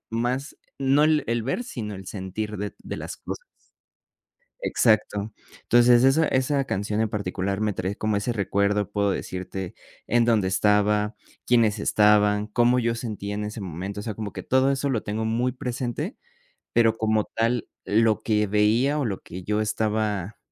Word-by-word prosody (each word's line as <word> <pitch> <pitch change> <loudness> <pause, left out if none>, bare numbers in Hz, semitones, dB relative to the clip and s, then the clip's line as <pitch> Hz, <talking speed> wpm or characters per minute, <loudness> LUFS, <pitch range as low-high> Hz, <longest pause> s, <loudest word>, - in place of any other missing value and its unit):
más 125 +5 -2 0.2
no 140 +2 +3
el 155 -1 +3
el 115 0 0
ver, 135 - -2
sino 110 - -5
el 95 -1 -9
sentir 105 +2 -5
de 105 +1 -4
de - - -5
las - - -6
cosas. - - -7 1.1
Exacto. 110 - +1 0.3
Entonces, 120 0 +5
esa 145 +4 +4
esa 135 +2 +1
canción 105 -2 -2
en 110 - +1
particular 100 -1 -2
me 105 -1 +1
trae 95 +1 -3
como 110 -1 0
ese 105 +4 -1
recuerdo. 100 -1 0
Puedo 100 -1 +1
decirte 95 0 -5 0.3
en 120 -1 +3
dónde 110 -5 +2
estaba, 105 +2 +2 0.3
quiénes 115 -3 +3
estaban, 105 0 +3
cómo 120 +3 +3
yo 115 -1 0
sentía 105 -4 -5
en 105 +1 -3
ese 105 +1 -5
momento. 95 +2 -5
O - - -6
sea, 110 -1 -4
como 105 -1 -5
que - - -6
todo 130 +1 +3
eso 140 +1 -1
lo 115 -5 0
tengo 110 +1 -2
muy 120 +3 0
presente, 130 - -4 0.6
pero 115 -1 +3
como 110 -1 +1
tal, 115 +1 -1 0.2
lo 110 0 +2
que 105 -1 +1
veía, 110 +8 +2
o 145 - 0
lo 100 -5 -3
que 90 +2 -9
yo 105 +3 0
estaba 105 -2 -1
110 Hz, 170 wpm, -25 LUFS, 105-120 Hz, 1.1 s, Entonces